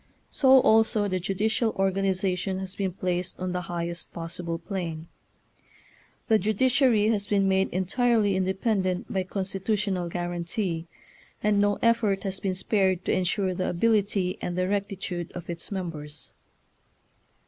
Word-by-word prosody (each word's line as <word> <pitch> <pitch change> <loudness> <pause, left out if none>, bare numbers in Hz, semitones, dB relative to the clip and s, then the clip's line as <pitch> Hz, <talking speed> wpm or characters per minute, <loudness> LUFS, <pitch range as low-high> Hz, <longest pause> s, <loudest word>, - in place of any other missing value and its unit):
So 265 -1 +6
also 220 -2 +4
the 185 -1 -1
ju 185 +2 -3
dicial 220 +3 +1
organization 190 -1 0
has 190 -1 -5
been 195 -2 -2
placed 180 0 -2
on 185 0 -2
the 180 0 -2
highest 170 0 -4
possible 170 0 -4
plane. 165 -3 -5 1.2
The 220 -2 +4
judiciai 235 +2 +3
y 220 - +3
has 205 -1 -2
been 200 -1 +2
made 190 0 +2
entirely 205 +2 +2
independent 190 0 0
by 190 - +1
constitutional 190 -1 -2
guarantee, 175 0 -3 0.6
and 210 -1 +3
no 205 0 +2
effort 230 -4 +2
has 195 -1 -2
been 190 -2 -1
spared 190 -2 +1
to - - +1
ensure 185 +1 +1
the 185 +1 -1
ability 200 -1 +1
and 175 0 -3
the 185 0 +1
rectitude 195 -3 -3
of 175 -1 -6
its 170 +4 -7
members. 155 -6 -4
190 Hz, 140 wpm, -27 LUFS, 180-205 Hz, 1.2 s, So